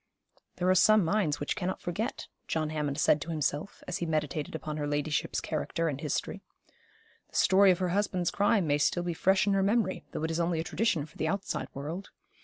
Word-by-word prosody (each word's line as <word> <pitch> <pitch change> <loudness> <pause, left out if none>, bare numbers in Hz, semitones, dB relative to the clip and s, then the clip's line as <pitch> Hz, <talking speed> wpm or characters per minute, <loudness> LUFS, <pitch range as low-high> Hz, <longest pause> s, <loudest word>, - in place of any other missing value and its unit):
'There 180 - -1
are 185 - +6
some 210 +1 +5
minds 165 -4 +1
which 145 - -2
cannot 185 -1 -2
forget,' 220 +9 -3 0.2
John 155 -1 -1
Hammond 150 -2 -2
said 150 - +3
to 170 - -6
himself, 150 +2 -2
as 180 +1 -3
he 170 - -2
meditated 155 -1 -2
upon 155 -1 -4
her 145 -1 -2
ladyship's 145 0 -1
character 165 0 -2
and 145 -2 -3
history. 150 - -3 0.9
'The - - -18
story 195 +1 +5
of 180 - +4
her 185 -1 -1
husband's 185 -2 0
crime 205 -1 +2
may 145 -1 +1
still 175 +4 +1
be 175 -1 -2
fresh 190 +3 +3
in 200 - +2
her 195 - +2
memory, 200 -1 +1
though - - -4
it 160 - -1
is 165 - -1
only 170 -1 +1
a - - -1
tradition 170 -4 0
for 155 - -18
the 160 - -1
outside 195 +4 -2
world. 160 +8 -5
170 Hz, 210 wpm, -29 LUFS, 155-190 Hz, 0.9 s, are